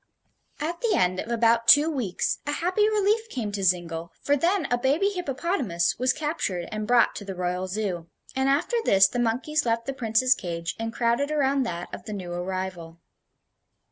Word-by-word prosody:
At 335 +3 -3
the 465 -3 +2
end 185 0 +1
of - - -5
about 230 0 +2
two 295 +2 +7
weeks 250 - -1
a 290 - 0
happy 370 +7 +1
relief 430 +2 +1
came 225 - -4
to 200 -1 -4
Zingle, 170 -2 0
for 285 - +1
then 345 +4 +1
a 245 - +3
baby 285 +10 +2
hippopotamus 280 - -1
was 255 +1 +3
captured 255 - -3
and 215 0 -4
brought 240 -1 +4
to - - -6
the 195 -1 -6
Royal 180 +1 -2
Zoo, 185 -4 -3 0.3
and 265 +1 +1
after 300 - +1
this 195 - +5
the 245 +5 -4
monkeys 250 +7 0
left 230 -1 0
the 275 - -3
Prince's 250 +1 +2
cage 170 -6 -5
and 225 0 -3
crowded 235 +4 0
around 275 -3 +1
that 175 -2 -6
of - - -8
the 215 - -6
new 185 -3 -6
arrival. 175 -2 -5
235 Hz, 185 wpm, -25 LUFS, 185-290 Hz, 0.3 s, two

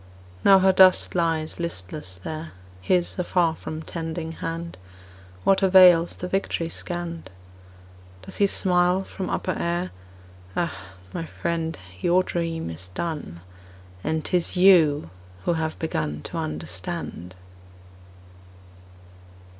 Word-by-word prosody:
Now 195 - +8
her 190 0 +5
dust 185 0 +5
lies 165 -2 0
listless 150 - -5
there, 155 - -7 0.3
His 175 - +1
afar 175 -2 +2
from 155 0 -6
tending 165 0 -5
hand, 165 +1 -5 0.7
What 195 0 +4
avails 180 -3 +7
the 180 - -5
victory 180 -3 -1
scanned? 170 - -5 0.9
Does - - -4
he 200 - +4
smile 180 -1 +2
from 190 -1 -6
upper 185 - -1
air: 175 +1 -1 0.6
"Ah, 170 - 0 0.4
my 165 - -4
friend, 165 -2 -3 0.2
your 180 - +3
dream 165 - -3
is 85 +3 -8
done; 120 - -5 0.6
And 160 -1 -1
'tis 180 0 0
you 160 - +5 0.3
who - - +2
have 160 -1 -2
begun 75 - -3
To - - -6
understand! 85 +3 -5
165 Hz, 115 wpm, -24 LUFS, 155-180 Hz, 0.9 s, Now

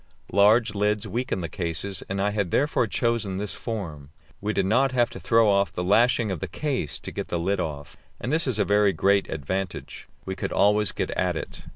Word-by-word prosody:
Large 105 +4 +4
lids 105 +1 0
weaken 115 -1 -2
the 85 - -3
cases, 90 +3 -3
and 95 +1 -2
I 100 +1 +1
had 100 -3 -1
therefore 135 - +1
chosen 105 -1 0
this 105 0 -2
form. 80 - -6 0.3
We 105 +1 -1
did 100 -3 0
not 130 +7 +2
have 120 -2 +2
to - - -8
throw 115 -1 +3
off 100 -3 +3
the 90 - -3
lashing 115 +3 +3
of 90 - -3
the 95 - -4
case 130 - -3
to - - -8
get - - -5
the 85 - -2
lid 95 +3 0
off, 75 -4 -5 0.2
and 130 - -3
this 160 -2 +3
is 125 -5 +2
a 105 - +2
very 105 -1 +3
great 100 0 +2
advantage; 90 +5 -4 0.2
we 95 - -4
could - - -4
always 105 0 +3
get - - -3
at - - 0
it. - - -7
100 Hz, 215 wpm, -25 LUFS, 95-115 Hz, 0.3 s, Large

